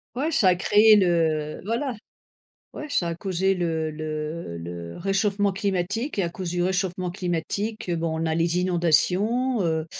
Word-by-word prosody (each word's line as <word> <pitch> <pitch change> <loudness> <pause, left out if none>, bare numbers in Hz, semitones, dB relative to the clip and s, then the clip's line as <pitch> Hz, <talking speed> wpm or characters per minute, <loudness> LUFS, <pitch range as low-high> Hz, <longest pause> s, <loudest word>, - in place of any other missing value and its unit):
Ouais, 290 +6 -1
ça 210 - +4
a 180 - +4
créé 210 +4 +5
le 165 -5 +1
voilà. 240 +4 -2 0.8
Ouais, 300 - -6
ça 175 -10 +1
a 170 - -2
causé 190 +2 0
le 165 -3 -1
le 155 - -5
le 85 0 -7
réchauffement 200 +2 +1
climatique 200 +6 -2
et - - +3
à 175 - 0
cause 175 +1 -5
du 175 0 -1
réchauffement 185 -1 -1
climatique, 185 +4 -3
bon, 165 -1 -2
on 165 - -1
a 160 - 0
les 170 +1 +1
inondations, 185 +8 +2
heu, 160 -2 0
180 Hz, 160 wpm, -24 LUFS, 165-205 Hz, 0.8 s, créé